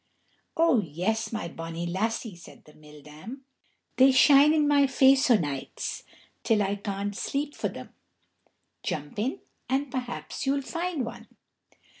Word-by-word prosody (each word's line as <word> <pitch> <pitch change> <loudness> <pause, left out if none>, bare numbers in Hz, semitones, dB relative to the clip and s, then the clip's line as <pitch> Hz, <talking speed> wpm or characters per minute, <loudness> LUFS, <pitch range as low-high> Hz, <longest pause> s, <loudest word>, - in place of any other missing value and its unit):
"Oh, 325 -7 +4
yes, 190 +7 -2
my 215 -6 -3
bonnie 165 0 -6
lassie," 210 +3 -2
said 170 - -15
the 150 - -17
mill 150 -1 -16
dam. 195 - -11 0.5
"They 265 +1 +7
shine 280 +2 +6
in 305 -2 +3
my 290 -1 +4
own 280 - +4
face 265 0 +4
o' 240 - +7
nights 145 -6 -5 0.4
till 215 -3 +2
I 200 +1 -1
can't 200 0 -4
sleep 280 +5 -3
for - - -2
them. - - -10 0.9
Jump 150 +6 -4
in 245 +6 -2 0.3
and 270 +1 -1
perhaps 250 0 -5
you'll 275 +1 +1
find 335 -3 -3
one." - - -9
225 Hz, 150 wpm, -27 LUFS, 175-275 Hz, 0.9 s, They